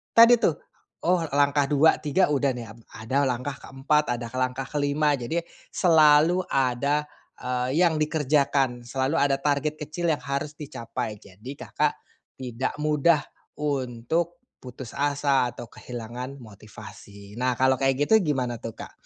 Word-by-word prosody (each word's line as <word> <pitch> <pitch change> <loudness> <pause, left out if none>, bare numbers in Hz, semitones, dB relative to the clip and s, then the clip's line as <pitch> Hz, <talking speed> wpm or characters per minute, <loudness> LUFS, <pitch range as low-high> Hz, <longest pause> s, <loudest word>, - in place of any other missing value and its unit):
tadi, 230 +1 +8
tuh, 165 - +2 0.5
oh, 180 +1 +3 0.2
langkah 145 0 +3
2, 150 +2 +4
3 150 +2 +1
udah, 140 -1 +2
nih, 120 - -6
ap 115 - -15 0.2
ada 130 +6 0
langkah 130 +3 -3
keempat, 135 0 0
ada 120 -1 -6
langkah 130 +1 -1
kelima. 145 0 +1
Jadi 160 +8 -2 0.4
selalu 160 0 +5
ada, 140 +3 0 0.3
eee, 125 +2 -2
yang 160 -2 +2
dikerjakan 140 -5 +1
selalu 135 +4 -1
ada 140 -1 +3
target 145 +1 0
kecil 155 +3 -3
yang 150 - -1
harus 140 +2 -3
dicapai, 115 -6 -5
jadi 105 +7 -11
Kakak - - 0 0.5
tidak 125 0 -3
mudah 150 +1 +3 0.4
untuk 145 +4 -2 0.2
putus 125 -1 -9
asa 140 -2 +1
atau 120 - -9
kehilangan 125 +2 -7
motivasi. 100 -1 -13
Nah 125 -1 +1
kalau 130 0 +4
kayak 135 +1 +2
gitu 220 0 +6
gimana, 125 -6 -1
tuh, 115 0 -7
Kak? - - -9
140 Hz, 140 wpm, -25 LUFS, 125-150 Hz, 0.5 s, tadi